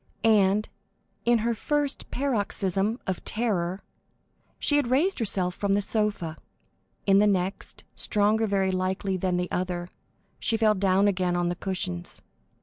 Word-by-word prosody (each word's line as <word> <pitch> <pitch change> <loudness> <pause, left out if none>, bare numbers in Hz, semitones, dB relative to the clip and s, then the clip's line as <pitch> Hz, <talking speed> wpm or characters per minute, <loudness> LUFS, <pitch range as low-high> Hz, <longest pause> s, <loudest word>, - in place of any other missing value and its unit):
And, 210 -2 +3 0.6
in 240 0 +4
her 235 - +2
first 290 +4 -1
paroxysm 210 -4 0
of 190 -2 -3
terror, 195 -5 -1 0.7
she 290 - +2
had 285 -5 +1
raised 315 +10 +2
herself 190 -5 +1
from 200 +2 -1
the 205 - +2
sofa, 205 -7 0 0.7
in 195 0 +5
the 210 - +4
next, 190 -1 -2
stronger 215 +2 +2
very 195 -2 +1
likely 185 +1 -1
than 185 -1 0
the 180 0 -2
other, 180 -1 -2 0.5
she 225 - +1
fell 220 -1 +4
down 195 0 +2
again 185 -3 +1
on 175 0 0
the 175 - -2
cushions. 180 -2 -4
195 Hz, 145 wpm, -26 LUFS, 185-220 Hz, 0.7 s, in